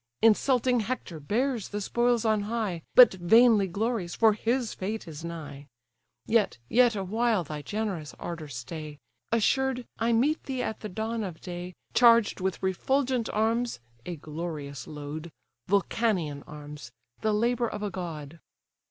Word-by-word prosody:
Insulting 245 Hz, +2 st, +4 dB
Hector 215 Hz, -7 st, -4 dB
bears 230 Hz, -, -1 dB
the 205 Hz, -, -3 dB
spoils 235 Hz, +2 st, +1 dB
on 215 Hz, -1 st, +3 dB
high, 215 Hz, -7 st, -2 dB
But 250 Hz, -4 st, +9 dB
vainly 210 Hz, +3 st, +5 dB
glories, 200 Hz, -1 st, -2 dB
for 220 Hz, -1 st, +5 dB
his 230 Hz, +2 st, -1 dB
fate 210 Hz, +1 st, -4 dB
is 160 Hz, 0 st, -8 dB
nigh. 150 Hz, -4 st, -7 dB, 0.6 s
Yet, 220 Hz, -, +2 dB
yet 240 Hz, -, +4 dB
awhile 215 Hz, +1 st, +1 dB
thy 150 Hz, -1 st, -6 dB
generous 190 Hz, -3 st, -4 dB
ardour 165 Hz, -3 st, -6 dB
stay; 150 Hz, +4 st, -7 dB, 0.3 s
Assured, 250 Hz, +2 st, +1 dB
I 230 Hz, +1 st, +2 dB
meet 270 Hz, +8 st, +2 dB
thee 260 Hz, -2 st, -2 dB
at 220 Hz, -, -3 dB
the 215 Hz, -, -6 dB
dawn 220 Hz, +3 st, -3 dB
of 175 Hz, -5 st, -6 dB
day, 180 Hz, 0 st, -7 dB, 0.2 s
Charged 230 Hz, -5 st, +5 dB
with 190 Hz, 0 st, -2 dB
refulgent 250 Hz, +6 st, 0 dB
arms 230 Hz, +3 st, 0 dB, 0.2 s
(a 175 Hz, -, -5 dB
glorious 150 Hz, -2 st, -6 dB
load), 150 Hz, +2 st, -7 dB, 0.4 s
Vulcanian 190 Hz, -6 st, +1 dB
arms, 150 Hz, -5 st, -9 dB, 0.3 s
the 215 Hz, -, +1 dB
labour 235 Hz, +3 st, +1 dB
of 210 Hz, -1 st, -5 dB
a 205 Hz, -, -2 dB
god." 165 Hz, -3 st, -6 dB
205 Hz, 145 wpm, -28 LUFS, 165-230 Hz, 0.6 s, But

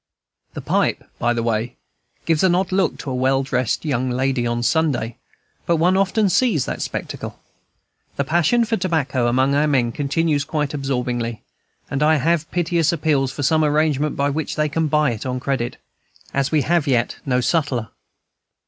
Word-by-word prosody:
The -, -, -5 dB
pipe, -, -, 0 dB, 0.2 s
by 120 Hz, -, +1 dB
the 120 Hz, -1 st, -1 dB
way, 115 Hz, +1 st, -1 dB, 0.5 s
gives 165 Hz, -2 st, +2 dB
an 180 Hz, -2 st, +4 dB
odd 185 Hz, +1 st, 0 dB
look 185 Hz, -4 st, +1 dB
to 135 Hz, -, -6 dB
a -, -, -2 dB
well 135 Hz, +1 st, +2 dB
dressed 130 Hz, +1 st, -1 dB
young 130 Hz, -3 st, 0 dB
girl 130 Hz, -1 st, 0 dB
on 120 Hz, 0 st, -2 dB
Sunday, 130 Hz, -6 st, 0 dB, 0.5 s
but 170 Hz, -, +3 dB
one 175 Hz, +3 st, +3 dB
often 195 Hz, +2 st, +2 dB
sees 190 Hz, -, +2 dB
that -, -, -4 dB
spectacle. -, -, -5 dB, 0.8 s
The 140 Hz, -, 0 dB
passion 175 Hz, -, +2 dB
for 225 Hz, 0 st, 0 dB
tobacco 145 Hz, -9 st, 0 dB
among 130 Hz, +3 st, +2 dB
our 145 Hz, +2 st, +3 dB
men 130 Hz, -5 st, +2 dB
continues 145 Hz, +2 st, 0 dB
quite 150 Hz, 0 st, -2 dB
absorbing, 125 Hz, -5 st, -2 dB, 0.5 s
and 135 Hz, -, -1 dB
I 155 Hz, +1 st, +4 dB
have 160 Hz, +2 st, +1 dB
piteous 170 Hz, -2 st, +1 dB
appeals 145 Hz, -5 st, +1 dB
for 145 Hz, -, -5 dB
some 155 Hz, +3 st, +3 dB
arrangement 150 Hz, -1 st, +1 dB
by 140 Hz, +1 st, +1 dB
which 155 Hz, +2 st, -3 dB
they 150 Hz, 0 st, 0 dB
can 160 Hz, +2 st, 0 dB
buy 150 Hz, -2 st, +2 dB
it 110 Hz, -, -5 dB
on 125 Hz, -1 st, -3 dB
credit, 125 Hz, -2 st, -2 dB, 0.6 s
as 140 Hz, 0 st, 0 dB
we 155 Hz, -3 st, +2 dB
have 170 Hz, -1 st, +1 dB
yet 120 Hz, -3 st, +1 dB
no 125 Hz, -2 st, +1 dB
sutler. 130 Hz, -, 0 dB
145 Hz, 175 wpm, -21 LUFS, 130-160 Hz, 0.8 s, an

